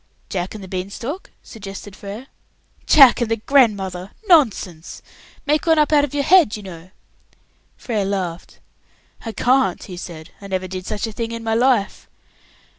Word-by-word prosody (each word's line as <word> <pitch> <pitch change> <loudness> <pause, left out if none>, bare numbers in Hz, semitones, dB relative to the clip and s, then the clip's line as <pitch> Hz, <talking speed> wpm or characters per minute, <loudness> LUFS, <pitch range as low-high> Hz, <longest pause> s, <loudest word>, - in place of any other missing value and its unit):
"'Jack 185 +1 -4
and 210 - -8
the - - -9
Beanstalk'?" 200 - -5
suggested 195 -2 -9
Frere. 205 +5 -8 0.6
"Jack 270 -4 +7
and 235 - 0
the 225 - +2
grandmother! 205 -7 +1 0.2
Nonsense. 215 - +1 0.4
Make 300 +2 0
one 325 -1 +4
up 300 0 +3
out 290 -1 +5
of 290 0 -3
your 285 - +1
head, 335 - +5
you 210 - -10
know." 175 -2 -10 0.9
Frere 220 -5 -2
laughed. 185 -4 -4 0.7
"I - - -2
can't," 250 -4 +1
he 180 -3 -9
said. 165 -3 -9
"I 200 - -9
never 185 -1 -3
did 185 0 -7
such 215 -1 -2
a 225 - -5
thing 230 +1 -4
in 230 0 -6
my 225 -1 -1
life." 235 -3 +1
210 Hz, 165 wpm, -20 LUFS, 190-260 Hz, 0.9 s, Jack